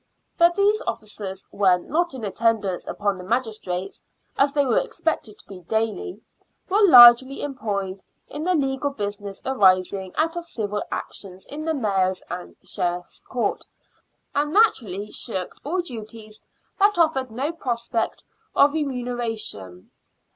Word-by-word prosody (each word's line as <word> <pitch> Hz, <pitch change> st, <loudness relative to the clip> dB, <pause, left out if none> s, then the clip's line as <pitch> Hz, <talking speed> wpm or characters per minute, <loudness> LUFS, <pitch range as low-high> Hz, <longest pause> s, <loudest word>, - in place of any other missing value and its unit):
But 340 Hz, 0 st, +4 dB
these 410 Hz, +2 st, +3 dB
officers, 210 Hz, -4 st, -5 dB
when 185 Hz, -3 st, +2 dB
not 340 Hz, 0 st, 0 dB
in 250 Hz, -, -7 dB
attendance 205 Hz, -3 st, 0 dB
upon 200 Hz, -2 st, -1 dB
the -, -, -8 dB
magistrates, 200 Hz, -4 st, -3 dB, 0.3 s
as 275 Hz, +1 st, +3 dB
they 285 Hz, -1 st, +2 dB
were 250 Hz, -, +3 dB
expected 325 Hz, -, -3 dB
to -, -, -18 dB
be 195 Hz, -2 st, -10 dB
daily, 225 Hz, -, -2 dB, 0.5 s
were 400 Hz, +3 st, +2 dB
largely 260 Hz, -, +8 dB
employed 200 Hz, -8 st, -3 dB, 0.3 s
in 295 Hz, -, -6 dB
the 365 Hz, +1 st, +2 dB
legal 270 Hz, -1 st, 0 dB
business 205 Hz, -5 st, -5 dB
arising 190 Hz, -5 st, +2 dB
out 325 Hz, +2 st, +1 dB
of 345 Hz, 0 st, -5 dB
civil 210 Hz, -8 st, -3 dB
actions 190 Hz, -2 st, -6 dB
in 305 Hz, +2 st, -6 dB
the 320 Hz, -1 st, 0 dB
Mayor's 190 Hz, -7 st, 0 dB
and 180 Hz, -, -7 dB
Sheriffs' 175 Hz, 0 st, -3 dB
Courts, 245 Hz, -, -2 dB, 0.7 s
and 295 Hz, +1 st, 0 dB
naturally 215 Hz, -, +2 dB
shirked 190 Hz, -6 st, -3 dB
all 355 Hz, +6 st, -1 dB
duties 220 Hz, -6 st, -9 dB, 0.4 s
that 405 Hz, -1 st, +4 dB
offered 310 Hz, -6 st, +2 dB
no 260 Hz, +8 st, -2 dB
prospect 235 Hz, -7 st, -3 dB, 0.3 s
of 285 Hz, +1 st, +5 dB
remuneration. 240 Hz, -, -4 dB
230 Hz, 135 wpm, -23 LUFS, 200-290 Hz, 0.7 s, largely